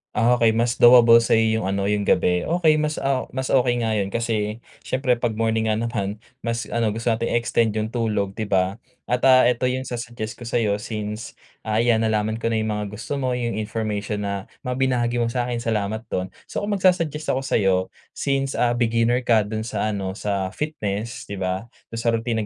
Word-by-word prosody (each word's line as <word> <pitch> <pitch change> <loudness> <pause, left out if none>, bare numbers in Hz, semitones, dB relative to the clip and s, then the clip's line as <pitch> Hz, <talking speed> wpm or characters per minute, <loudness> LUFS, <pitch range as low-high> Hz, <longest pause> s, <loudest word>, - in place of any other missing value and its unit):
Ah, 120 +3 +3
okay 115 -2 +4
mas 115 +1 0
doable 120 -1 +8
sa 115 - +2
yung 110 -2 +2
ano, 100 +1 0
yung 105 -1 0
gabi. 90 0 +2
Okey 160 -2 +3
mas 150 0 -1
a 135 -1 0
mas 130 0 -3
okey 125 -2 +2
nga 110 -1 0
yun. 100 -1 -2
Kasi 115 -1 -1 0.2
siyempre 130 -2 +1
'pag 120 -2 -1
morning 110 0 0
nga 110 - +2
naman, 110 -2 -3 0.2
mas 115 0 -2
ano 115 -3 0
gusto 115 +2 -2
nating 115 +1 0
i-extend 115 -2 +1
yung 110 0 -2
tulog, 105 -4 -1
'di 110 - -2
ba? 95 0 +1 0.3
At, 125 - +2
ah, 130 -1 +7
ito 125 +1 +2
yung 130 +1 -1
sa-suggest 120 -3 -6
ko 120 - -8
sa'yo 105 -3 0
since, 105 +1 -5 0.3
ayan, 110 +1 +2
nalaman 110 +1 0
ko 115 - -1
na 115 - 0
yung 110 0 0
mga 105 -1 -2
gusto 140 +6 -4
mo, 130 -2 0
yung 120 -1 -2
information 105 -1 -3
na 100 -1 -4 0.2
mga 125 +1 -3
binahagi 120 -2 +1
mo 120 - +1
sa'kin. 120 0 -2
Salamat 110 -1 -2
don. 95 0 -3 0.2
So, - - -4
kung 205 - -2
magsu-suggest 175 -6 +1
ako 135 - -2
sa'yo 95 -7 +2 0.4
since 135 -1 -1
a 120 - +2
beginner 120 0 +2
ka 115 -4 +3
do'n 110 +2 -4
sa 110 0 -1
ano 95 -2 -3
sa 100 -2 -2
fitness, 115 -6 -4
'di 100 - -5
ba, 95 +3 -2 0.3
dun 115 - -4
sa 115 0 +1
routine 115 -1 -1
115 Hz, 200 wpm, -23 LUFS, 105-120 Hz, 0.4 s, doable